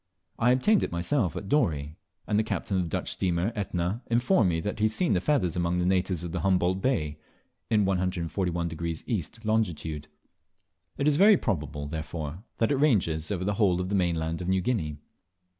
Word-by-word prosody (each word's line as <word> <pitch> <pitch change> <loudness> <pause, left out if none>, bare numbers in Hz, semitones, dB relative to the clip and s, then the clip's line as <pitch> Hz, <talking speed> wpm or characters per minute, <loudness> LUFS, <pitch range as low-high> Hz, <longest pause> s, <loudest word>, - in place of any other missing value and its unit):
I 120 - +4
obtained 190 +12 +3
it - - -2
myself 90 - 0
at 100 - -5
Dorey; 75 - 0 0.3
and 105 -1 +1
the - - +2
captain 100 -2 -2
of - - +2
the 85 - -3
Dutch - - -2
steamer 90 +2 0
Etna 95 +1 -2
informed 120 - +3
me 80 -1 0
that 105 +4 -4
he 110 - +3
had 110 - +2
seen 175 +9 +1
the 90 - +1
feathers 115 - +1
among 85 0 0
the 90 - +1
natives 90 -2 +1
of 85 -1 -5
Humboldt 95 0 +1
Bay, 75 - 0 0.5
in 105 -3 +3
141° 85 -3 -2
E. 110 -9 -1 0.2
longitude. 85 -9 -1 0.9
It 140 - 0
is 150 -1 +4
very 205 +2 +7
probable, 75 - -2
therefore, 80 +2 -5
that 115 - +1
it 140 - +2
ranges 90 - +2
over 90 -3 -1
the 105 - +1
whole 90 -4 +3
of 90 0 -2
the - - -2
mainland 85 -3 0
of 90 - -4
New 95 0 +2
Guinea. 85 -10 -1
90 Hz, 190 wpm, -27 LUFS, 85-110 Hz, 0.9 s, very